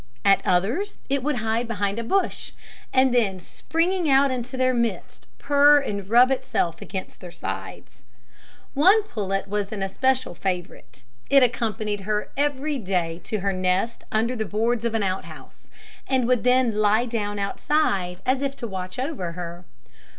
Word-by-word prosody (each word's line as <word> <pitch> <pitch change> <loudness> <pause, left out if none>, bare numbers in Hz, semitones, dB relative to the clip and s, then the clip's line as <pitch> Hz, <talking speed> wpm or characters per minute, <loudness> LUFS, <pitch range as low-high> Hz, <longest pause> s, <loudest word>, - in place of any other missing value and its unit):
At 195 -1 +5
others 225 - 0
it 275 0 +1
would 295 +2 -1
hide 225 +1 -1
behind 205 -2 -2
a - - -3
bush, 385 +11 -1 0.4
and 260 -1 +3
then 215 -6 +2
springing 330 - -1
out 275 0 +4
into 255 +1 -4
their 255 0 +2
midst, 235 -2 -3
purr 290 +1 +5
and 200 -8 -4
rub 245 +3 +6
itself 170 -9 -1
against 190 -1 -6
their 180 - -8
sides. - - -7 0.7
One 380 +10 +5
pullet 195 - -3
was 205 0 -2
its 205 -3 -3
especial 260 +6 0
favourite; 180 -7 -5 0.3
it 275 -1 +6
accompanied 215 -4 -1
her 210 +1 -2
every 285 0 -1
day 180 -5 -2
to 215 -3 -2
her 195 0 0
nest 185 +5 -1
under 230 +3 +1
the 220 - -1
boards 225 +3 -1
of 230 -1 -1
an 220 - +1
out 190 0 -2
house, - - -14 0.4
and 260 -3 +1
would 250 -2 +2
then 250 -2 +3
lie 215 +3 +3
down 210 -4 -3
outside, 200 - 0
as 260 +1 +1
if 275 -1 -2
to 235 - -5
watch 185 -2 -6
over 255 - -3
her. 175 0 -7
225 Hz, 165 wpm, -24 LUFS, 195-260 Hz, 0.7 s, rub